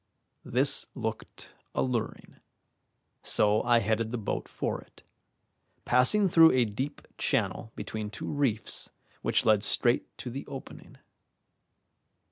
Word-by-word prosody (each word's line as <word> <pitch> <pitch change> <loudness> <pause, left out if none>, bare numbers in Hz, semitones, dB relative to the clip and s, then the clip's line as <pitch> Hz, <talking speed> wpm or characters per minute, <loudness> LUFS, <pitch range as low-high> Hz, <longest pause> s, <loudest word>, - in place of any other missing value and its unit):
This - - +1
looked - - -6 0.2
alluring, 125 -4 -3 0.8
so 105 +1 +2
I 120 -1 +3
headed 110 +2 0
the 120 - -3
boat 110 - -3
for - - -3
it, - - -21 0.8
passing 130 +12 +5
through 165 -2 +6
a 125 -2 +3
deep 130 +7 -5
channel 115 - -1
between 105 0 -5
two 105 - -7
reefs 135 -7 -1 0.3
which - - +1
led 105 -2 +4
straight 120 +3 +2
to 125 - -6
the 135 +3 -7
opening. 135 - -10
120 Hz, 115 wpm, -28 LUFS, 110-130 Hz, 0.8 s, through